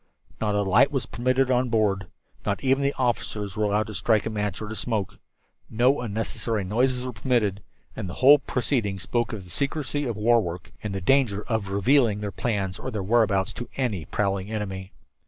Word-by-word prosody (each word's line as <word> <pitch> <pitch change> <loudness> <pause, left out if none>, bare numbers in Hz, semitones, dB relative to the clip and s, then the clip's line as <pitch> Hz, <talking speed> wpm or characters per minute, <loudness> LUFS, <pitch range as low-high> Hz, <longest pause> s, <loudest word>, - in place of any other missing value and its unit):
Not 105 -2 0
a 105 - +2
light 100 +8 +5
was 135 -4 -1
permitted 130 +2 +1
on 125 0 +2
board. 100 -5 +1 0.4
Not - - -2
even 135 +1 +3
the 140 0 0
officers 105 -5 -1
were 105 - +1
allowed 105 +1 +1
to 110 - -8
strike 110 +1 +2
a 110 - -2
match 105 -2 -2
or 110 - -5
to 110 - -6
smoke. 110 -5 -3 0.5
No 125 +5 +3
unnecessary 110 -1 -2
noises 125 +6 +1
were 125 - -4
permitted, 105 -6 0 0.3
and 100 -4 -5
the - - -6
whole 145 +3 +7
proceeding 120 -7 -1
spoke 120 +5 -1
of 105 -5 -6
the 90 - -13
secrecy 145 0 -2
of 115 -4 -3
war 115 +2 +4
work 85 -2 -6
and 105 -2 -4
the 95 - -3
danger 105 -2 +2
of 110 -4 -1
revealing 105 +2 +3
their 105 -1 -4
plans 100 -4 -2
or 130 - -4
their 105 -5 -3
whereabouts 100 -2 +2
to 120 - -7
any 110 - -1
prowling 100 -1 -1
enemy. 95 -3 -4
110 Hz, 195 wpm, -25 LUFS, 100-125 Hz, 0.5 s, whole